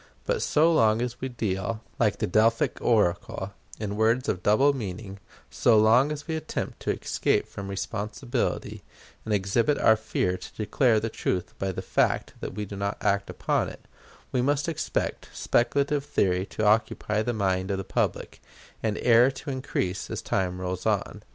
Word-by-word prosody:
But - - 0
so 160 +3 +3
long 110 -6 +4
as 120 0 -3
we 130 - -2
deal, 110 -1 -3 0.2
like 110 -4 +2
the - - 0
Delphic 115 +4 +2
oracle, 100 -2 +1 0.3
in 105 -1 -3
words 115 +5 +2
of 90 - -1
double 135 +9 +4
meaning, 100 -4 -6 0.3
so 115 -2 +4
long 115 +7 +5
as 150 +1 -6
we 160 - -1
attempt 155 0 -4
to - - -2
escape - - 0
from 100 - -7
responsibility, 100 - -3 0.4
and 110 - -4
exhibit 105 +7 +2
our 110 - +5
fear 95 -4 -1
to - - -11
declare 110 +1 +2
the 110 +1 -3
truth 90 -4 -2
by 95 0 -1
the - - -5
fact - - +1
that - - -6
we 105 0 -3
do 100 - -8
not 100 +1 -2
act 100 0 0
upon - - 0
it, - - -13 0.4
we 125 - +1
must 145 +3 +1
expect 165 - -2
speculative 140 +4 +1
theory 95 -7 +1
to 110 - -2
occupy 105 0 +2
the 120 - -1
mind 95 -3 0
of 100 - 0
the 95 - -3
public, - - -2 0.4
and 110 -2 -1
error 120 +1 +6
to 135 +1 -6
increase 95 -8 -3
as - - -4
time 90 -1 -1
rolls 90 0 -3
on. - - -1
110 Hz, 175 wpm, -26 LUFS, 95-125 Hz, 0.4 s, error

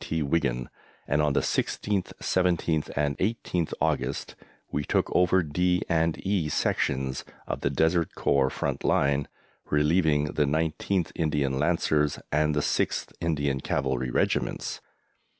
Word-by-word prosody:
T. 80 -1 -1
Wigan, 70 -5 0 0.4
and 75 +2 +2
on 75 -1 +2
the - - +2
16th, 100 -3 -1
17th, 85 -4 +1
and 70 -1 +1
18th 95 -5 -1
August 65 +2 -1 0.4
we 75 - -1
took - - 0
over 90 +1 +4
D 90 +4 +1
and 80 -1 +1
E 95 -6 +1
sections 65 -2 0 0.2
of - - -4
the - - +1
Desert 80 +4 +1
Corps 70 -2 +2
front - - -3
line, 70 0 +2 0.4
relieving 75 0 +3
the 75 - +2
19th 80 +4 0
Indian 75 -4 0
Lancers 75 -2 +1
and 75 0 +2
the 75 - +2
6th - - -1
Indian 70 -5 0
Cavalry 65 -2 -1
Regiments. - - -1
75 Hz, 135 wpm, -27 LUFS, 70-85 Hz, 0.4 s, over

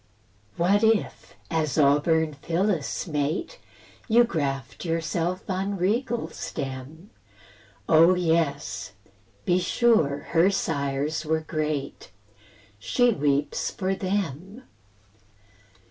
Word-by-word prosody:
What 195 +5 +3
if, 220 -1 0 0.2
as 155 -5 0
auburn 155 +2 +3
Phyllis' 170 +2 -1
mate, 155 - -2 0.5
You 240 +1 +6
graft 140 - -3
yourself 170 +2 -2
on 195 +1 -2
regal 230 +6 -1
stem? 135 +8 -7 0.8
Oh 165 +3 +6
yes! 145 - -1 0.5
be 180 0 +3
sure 175 - +2
her 170 +3 +4
sires 145 -4 -1
were 160 0 0
great; 155 -3 -3 0.7
She 245 - +2
weeps 145 -5 0
for 190 -1 -2
THEM. 190 - -3
165 Hz, 90 wpm, -25 LUFS, 145-190 Hz, 0.8 s, You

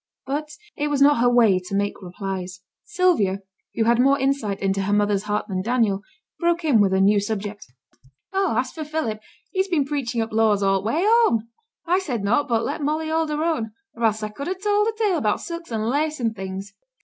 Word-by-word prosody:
But 295 +3 -3 0.3
it 295 - -1
was 290 -2 0
not 280 -2 +5
her 245 +1 +4
way 225 -6 +4
to 185 +2 -6
make 205 +1 -1
replies. 185 0 -6 0.2
Sylvia, 350 - +1 0.3
who 225 - +2
had 235 +1 +3
more 275 +2 +4
insight 265 -7 -1
into 195 0 0
her 200 +2 0
mother's 205 -1 +1
heart 210 0 -1
than 185 -3 -2
Daniel, 220 -3 +1 0.4
broke 340 -1 +1
in 250 -9 +4
with 195 -2 +3
a 190 - +2
new 200 +2 +4
subject. 205 0 -4 0.7
'Oh! 385 - +1
as 255 +1 0
for 315 - -6
Philip, 300 -8 -3 0.3
he's 380 0 0
been 325 -7 +1
preaching 270 -5 -2
up 225 0 -2
laws 215 -2 +3
all 195 -1 +2
t' 205 - -4
way 315 +10 +1
home. 425 - +3 0.4
I 355 +2 +2
said 255 - -3
naught, 240 +8 +2
but 230 -1 +1
let 295 +3 -3
Molly 310 +2 -1
hold 320 0 0
her 300 +1 -1
own; 235 -10 -1 0.2
or 235 - -7
else 215 -1 +2
I 215 - -2
could 280 +7 -7
ha' 370 +1 -2
told 415 +1 +2
a 450 - 0
tale 410 -7 +1
about 210 -5 0
silks 335 -4 -7
an' 220 -1 -1
lace 300 +6 0
an' 230 -2 0
things.' 195 0 -6
235 Hz, 220 wpm, -23 LUFS, 205-310 Hz, 0.7 s, not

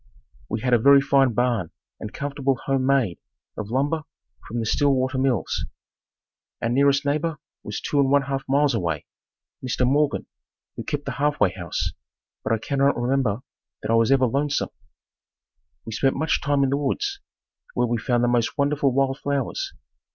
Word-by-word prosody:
We 110 0 -2
had 125 -1 +1
a 120 - +6
very 140 +4 +7
fine 135 -2 +3
barn 120 -7 +1 0.3
and 105 - -6
comfortable 140 -1 -1
home 135 -1 +1
made 130 -11 +2 0.4
of 105 -1 -5
lumber 145 +6 0 0.5
from 120 - -5
the 115 - -2
Stillwater 130 +1 +1
Mills. 130 -6 0 0.9
Our 115 - -1
nearest 140 +3 +3
neighbor 155 +2 0 0.2
was 105 - -5
two 145 - -1
and 135 -1 +3
one 140 0 +4
half 135 0 -3
miles 140 0 +3
away, 85 -9 -2 0.6
Mr. 125 0 0
Morgan 145 +3 +1 0.5
who - - -5
kept 145 -1 -3
the - - -2
halfway 145 -10 +2
house, 90 -3 -3 0.5
but - - -2
I 115 - +3
cannot 140 +3 +1
remember 125 -3 0 0.4
that - - -1
I - - +4
was 115 +2 +3
ever 135 -1 +5
lonesome. 140 +4 0 1.2
We 115 - -6
spent 135 +4 +1
much 155 +3 0
time 145 -1 +2
in 135 - +1
the 140 - +2
woods, 395 - -1 0.6
where 125 - +2
we 120 -1 -1
found 120 +1 +1
the - - +3
most 120 +2 +1
wonderful 140 -1 +2
wild 135 +1 +1
flowers. 140 -3 -2
135 Hz, 170 wpm, -24 LUFS, 120-140 Hz, 1.2 s, very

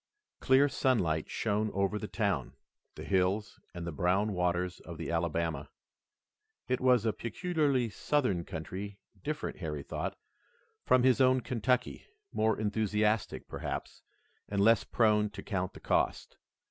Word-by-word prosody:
Clear 135 +2 +5
sunlight 95 - +1
shone 110 0 0
over 100 +2 +1
the 105 - -5
town, 100 - -1 0.4
the - - -7
hills 95 +2 0
and 85 -1 -6
the 85 - -3
brown 95 +7 +1
waters 90 0 0
of 85 0 -9
the 80 +1 -4
Alabama. 85 -3 -1 1.0
It 130 0 0
was 125 -3 +4
a 110 - +2
peculiarly 140 - 0
Southern 110 -5 0
country, 95 +6 -6 0.3
different, 155 0 -3
Harry 75 -5 -4
thought, - - -4 0.7
from 130 -1 +4
his 130 +1 +4
own 130 0 +5
Kentucky, 125 +1 -1 0.2
more 110 0 +1
enthusiastic, 105 0 0
perhaps, - - -5 0.5
and 100 - -1
less 110 +2 +5
prone 105 -2 +3
to 100 -1 -9
count 95 -3 -2
the - - -11
cost. - - 0
105 Hz, 135 wpm, -31 LUFS, 90-120 Hz, 1.0 s, Clear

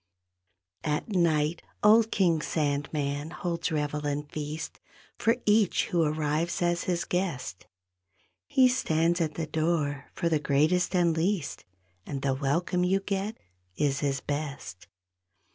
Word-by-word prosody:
At 150 +7 -1
night 165 -2 +2 0.2
old 220 +2 +6
King 170 -7 +2
Sandman 145 -1 -1
holds 170 0 -3
revel 150 -1 -1
and 145 +1 -2
feast 155 +1 -5 0.4
For 230 +2 +3
each 210 -2 +3
who 175 - +2
arrives 155 +2 0
as 175 0 +1
his 175 -2 0
guest; 170 - -3 0.8
He 260 -1 +5
stands 170 -8 +1
at 155 -2 -1
the 165 - -2
door 155 -2 -1
for 170 - -1
the 160 -2 +2
greatest 155 +7 +2
and 170 -2 +3
least, 170 -1 -1 0.4
And 140 +4 -5
the 135 -1 +2
welcome 170 +7 0
you 190 +2 +2
get 200 +2 -3 0.4
is 135 +3 +1
his 135 -2 -1
best. 140 - -5
160 Hz, 130 wpm, -28 LUFS, 145-180 Hz, 0.8 s, old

